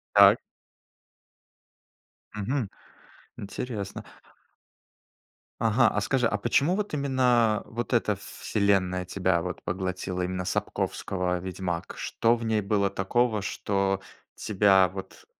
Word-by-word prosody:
Так. - - +8 1.9
Мгм, 105 +2 -2 0.7
интересно. 100 0 -5 1.6
Ага. 115 +2 +4
А - - -1
скажи, 125 -4 +2
а 105 - +1
почему 140 - +2
вот 210 -5 -3
именно 125 -6 +2
вот 120 +2 -4
эта 105 -4 +2 0.2
селенная 95 -3 +1
тебя 90 -2 +1
вот 90 +1 -5
поглотила? 90 0 -3
Именно 90 0 -3
Сапковского 90 -1 -2
"Ведьмак"? 90 -2 -4
Что 115 +1 +1
в 115 - -6
ней 110 -2 +1
было 100 0 +1
такого, 105 +3 +1
что 95 -1 -1 0.3
тебя 95 -2 +4
вот 95 0 -9
100 Hz, 105 wpm, -27 LUFS, 95-115 Hz, 1.9 s, Так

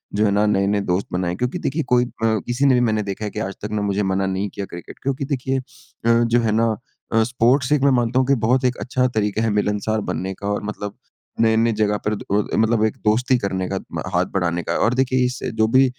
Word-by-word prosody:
जो 105 +1 +3
है 100 - +2
ना 105 +1 +3
नए-नए 100 0 +2
दोस्त 90 +3 0
बनाए। 90 -1 -1
क्योंकि 125 +5 -2
देखिए 155 +4 -1
कोई 125 0 +4
अ, - - -8 0.2
किसी 115 +4 +1
ने 135 - +5
भी - - +3
मैंने 110 -3 +1
देखा 100 +1 -4
है 105 - -4
कि - - -5
आज 100 -2 -3
तक 105 - -5
ना 105 -1 -1
मुझे 100 0 0
मना 95 0 0
नहीं 95 +2 -2
किया 100 +1 -5
क्रिकेट 85 -2 -10
क्योंकि 135 0 -1
देखिए 135 -1 -1
अ, - - -8 0.6
जो 120 +1 +2
है 115 -2 +1
ना 110 0 +2 0.4
अ, 115 0 +4
स्पोर्ट्स 125 +3 +2
एक 150 -2 +3
मैं 140 - +4
मानता 120 +1 +1
हूँ 130 - +1
कि 140 - +4
बहुत 130 +2 +3
एक 125 -1 +1
अच्छा 130 0 0
तरीक़ा 110 -3 -1
है 115 - +2
मिलनसार 105 +1 0
बनने 95 +1 -2
का 100 +2 -7
और 105 0 -1
मतलब 105 -1 -5 0.4
नए-नए 115 +1 +3
जगह 105 0 +2
पर 105 - +1
द - - -8 0.3
अ - - +1
मतलब 110 0 +2
एक 110 - -2
दोस्ती 125 +4 +3
करने 95 -4 -2
का 95 - -2
म - - -2
हाथ - - +2
बढ़ाने 85 -2 0
का। - - -1
और 115 - +2
देखिए 130 0 +2
इस 125 +1 -3 0.2
जो 110 0 +3
भी 135 - +7
110 Hz, 250 wpm, -21 LUFS, 100-125 Hz, 0.6 s, भी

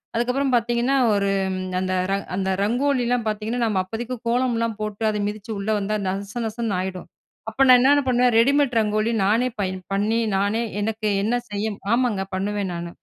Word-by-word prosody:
அதுக்கப்புறம் 250 +3 0
பாத்தீங்கன்னா, 240 +3 +1 0.2
ஒரு 200 -1 +1 0.3
ம் - - -3 0.2
அந்த 185 0 -1 0.2
ரங் 200 0 -1
அந்த 190 0 -1
ரங்கோலிலாம் 245 0 +1
பாத்தீங்கன்னா, 215 +3 -2
நம்ம 200 -4 +1
அப்பதைக்கு 235 +5 -5
கோலம்லாம் 230 -3 0
போட்டு, 215 +1 -4
அதை 210 -1 -2
மிதிச்சு 210 +1 -6
உள்ள 200 +2 -4
வந்தா, 210 +2 -1
நச 195 +1 -4
நசன்னு 220 -2 -3
ஆயிடும். 185 -1 -5 0.4
அப்போ 265 +5 +1
நான் 250 -1 +9
என்னென்ன 285 +3 +4
பண்ணுவேன்? 250 -1 +3
ரெடிமேட் 275 -1 +3
ரங்கோலி 215 +1 +1
நானே 230 +5 +2
பயன் 185 -1 -3
பண்ணி, 215 +3 +1 0.2
நானே 205 +4 0 0.2
எனக்கு 220 0 -2 0.2
என்ன 230 +3 +1 0.2
செய்யும் 205 0 -3
ஆமாங்க. 235 -5 +1
பண்ணுவேன் 200 -1 -2
நானு. 170 0 -6
220 Hz, 165 wpm, -23 LUFS, 200-245 Hz, 0.4 s, நான்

